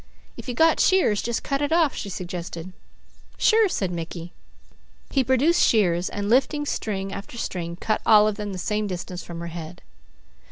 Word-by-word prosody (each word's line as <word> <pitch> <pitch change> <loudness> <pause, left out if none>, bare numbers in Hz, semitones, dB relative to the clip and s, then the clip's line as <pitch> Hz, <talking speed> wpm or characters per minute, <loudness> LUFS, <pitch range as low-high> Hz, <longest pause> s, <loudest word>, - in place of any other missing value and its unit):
"If - - -10
you 245 - -3
got 325 +4 +4
shears, 365 - +3
just 235 -1 -2
cut 275 0 -1
it 290 +1 -1
off," 325 -4 +3
she 200 - -5
suggested. 175 -1 -6 0.6
"Sure!" 440 -2 +4
said 190 - -1
Mickey. 170 0 -6 0.8
He 270 - +2
produced 260 +7 +3
shears 180 -5 +3
and 205 0 -4
lifting 275 +6 +2
string 195 -7 -3
after 200 +4 -8
string 170 -6 -4
cut 215 +4 -1
all 210 -1 +6
of 215 - +1
them 210 -1 -5
the 190 - -5
same 210 +3 -1
distance 180 -1 -5
from 170 -1 -8
her - - -5
head. 170 +1 -8
205 Hz, 175 wpm, -24 LUFS, 180-260 Hz, 0.8 s, all